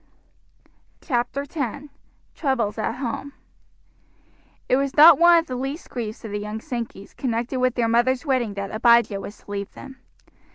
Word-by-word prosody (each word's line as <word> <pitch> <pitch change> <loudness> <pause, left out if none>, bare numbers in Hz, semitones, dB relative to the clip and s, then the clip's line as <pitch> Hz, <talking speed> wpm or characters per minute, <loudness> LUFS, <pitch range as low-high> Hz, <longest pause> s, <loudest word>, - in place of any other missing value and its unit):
CHAPTER 250 0 -2
X: 275 -1 -3 0.5
TROUBLES 240 -8 -1
AT 215 - -1
HOME 270 +2 -5 1.3
It - - +3
was 275 +1 -2
not 310 0 +9
one 345 0 +7
of 330 - +1
the 255 - -5
least 270 +5 -5
griefs 225 -2 -5
of 215 - -6
the 205 - -3
young 210 +1 -5
Sankeys 230 -6 -7
connected 245 +1 -2
with 255 -1 +1
their 235 -2 +1
mother's 245 +4 +1
wedding 250 -7 0
that 200 0 -5
Abijah 230 -3 +3
was 205 +2 -9
to - - -12
leave 200 0 -4
them. 265 - -11
245 Hz, 160 wpm, -23 LUFS, 220-275 Hz, 1.3 s, not